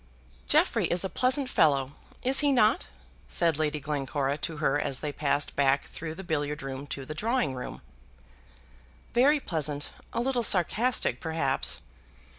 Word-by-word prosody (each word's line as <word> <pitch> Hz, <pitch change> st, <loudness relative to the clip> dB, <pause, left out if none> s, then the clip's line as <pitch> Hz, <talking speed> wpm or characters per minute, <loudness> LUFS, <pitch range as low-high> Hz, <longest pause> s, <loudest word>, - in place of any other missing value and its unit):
"Jeffrey -, -, +3 dB
is 175 Hz, +1 st, 0 dB
a 190 Hz, -, -2 dB
pleasant 260 Hz, +5 st, +2 dB
fellow, 140 Hz, -, +2 dB, 0.3 s
is 265 Hz, +2 st, +5 dB
he 290 Hz, -1 st, +5 dB
not?" 235 Hz, -, +3 dB, 0.4 s
said 165 Hz, -3 st, +2 dB
Lady 150 Hz, -1 st, 0 dB
Glencora 140 Hz, -1 st, -2 dB
to 160 Hz, 0 st, -4 dB
her 145 Hz, -1 st, +1 dB
as 140 Hz, -3 st, -3 dB
they 150 Hz, -, -2 dB
passed 145 Hz, 0 st, -1 dB
back 140 Hz, 0 st, +2 dB
through 160 Hz, -1 st, -7 dB
the 190 Hz, -, -8 dB
billiard 150 Hz, -4 st, -2 dB
room 135 Hz, +1 st, -6 dB
to 135 Hz, -1 st, -6 dB
the 155 Hz, -, -6 dB
drawing 215 Hz, -, 0 dB
room. 125 Hz, -1 st, -7 dB, 1.3 s
"Very 275 Hz, +6 st, +4 dB
pleasant; 150 Hz, -, -3 dB, 0.2 s
a -, -, -3 dB
little 250 Hz, 0 st, 0 dB
sarcastic, 220 Hz, +5 st, +3 dB
perhaps." 160 Hz, -, 0 dB
155 Hz, 150 wpm, -28 LUFS, 140-220 Hz, 1.3 s, is